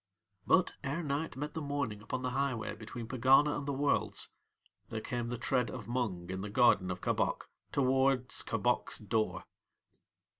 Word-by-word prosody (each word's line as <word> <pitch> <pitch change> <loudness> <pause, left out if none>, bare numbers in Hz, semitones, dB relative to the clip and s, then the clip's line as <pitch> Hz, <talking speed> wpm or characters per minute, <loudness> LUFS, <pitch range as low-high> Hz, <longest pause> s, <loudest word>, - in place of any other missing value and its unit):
But, 185 -1 +4
ere 145 +5 -2
night 145 0 -2
met 150 +2 -4
the 160 - -3
morning 140 -8 -2
upon 125 +4 -4
the 125 - -1
highway 130 -3 -1
between 115 +1 -7
Pegana 135 +5 +5
and 145 - -4
the - - +1
Worlds, 140 +1 +1 0.6
there 110 - -3
came 120 +1 -3
the 120 - -3
tread 125 0 +1
of 120 -5 -7
Mung 110 -8 -2
in 95 0 -3
the 105 - -4
garden 105 -4 +4
of 90 0 -4
Kabok - - 0 0.2
towards 130 -1 +2
Kabok's - - 0
door. 110 +1 -1
125 Hz, 160 wpm, -33 LUFS, 110-140 Hz, 0.6 s, Pegana